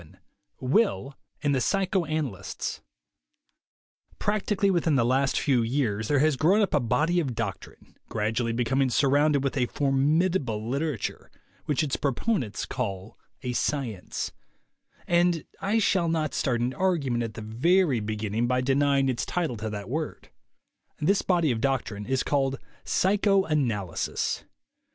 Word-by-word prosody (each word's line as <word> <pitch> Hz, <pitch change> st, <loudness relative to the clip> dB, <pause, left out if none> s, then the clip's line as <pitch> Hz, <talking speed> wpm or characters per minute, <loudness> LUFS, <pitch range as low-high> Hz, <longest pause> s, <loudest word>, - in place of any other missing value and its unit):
XI 80 Hz, -, -18 dB, 0.4 s
WILL 140 Hz, -, +1 dB, 0.3 s
AND 145 Hz, -1 st, +2 dB
THE 130 Hz, -, +1 dB
PSYCHOANALYSTS 155 Hz, -, -1 dB, 1.4 s
iRACTICALLY 205 Hz, -1 st, +1 dB
within 170 Hz, -4 st, +2 dB
the 120 Hz, -3 st, +3 dB
last 130 Hz, +2 st, +2 dB
few 130 Hz, -4 st, +2 dB
years 115 Hz, -3 st, 0 dB
there 145 Hz, -, +2 dB
has 155 Hz, +1 st, +3 dB
grown 180 Hz, +9 st, +4 dB
up 200 Hz, -, -1 dB
a 150 Hz, -, +4 dB
body 150 Hz, +9 st, +1 dB
of 135 Hz, -8 st, -2 dB
doctrine, 105 Hz, -5 st, -6 dB
gradually 110 Hz, +2 st, -1 dB
be 120 Hz, +2 st, 0 dB
coming 135 Hz, +2 st, +1 dB
surrounded 140 Hz, +2 st, +3 dB
with 135 Hz, -, -1 dB
a 125 Hz, -3 st, +1 dB
formidable 140 Hz, -, +1 dB
literature, 140 Hz, -2 st, -3 dB, 0.4 s
which 150 Hz, +1 st, +1 dB
its 140 Hz, -3 st, -1 dB
proponents 135 Hz, -, -1 dB
call 100 Hz, -3 st, -4 dB, 0.3 s
a 125 Hz, -1 st, -2 dB
"science"; 120 Hz, -7 st, -2 dB, 0.7 s
and 175 Hz, -2 st, +2 dB
I 205 Hz, +3 st, +1 dB
shall 190 Hz, -5 st, +2 dB
not 155 Hz, -2 st, 0 dB
start 120 Hz, -3 st, 0 dB
an 125 Hz, +2 st, 0 dB
argument 145 Hz, -9 st, 0 dB
at 115 Hz, -2 st, -4 dB
the 110 Hz, -, -6 dB
very 140 Hz, -, +2 dB
beginning 110 Hz, +2 st, -2 dB
by 125 Hz, +1 st, +1 dB
denying 135 Hz, +1 st, +2 dB
its 125 Hz, -2 st, -1 dB
title 165 Hz, -8 st, -1 dB
to 110 Hz, +1 st, -4 dB
that 100 Hz, -2 st, -6 dB
word. 155 Hz, +5 st, -4 dB, 0.7 s
This 195 Hz, +6 st, +2 dB
body 170 Hz, -6 st, +2 dB
of 110 Hz, -2 st, -2 dB
doctrine 115 Hz, -6 st, -1 dB
is 130 Hz, 0 st, +1 dB
called 135 Hz, -2 st, 0 dB, 0.3 s
"psychoanalysis." 160 Hz, -, +1 dB
135 Hz, 140 wpm, -27 LUFS, 115-160 Hz, 1.4 s, grown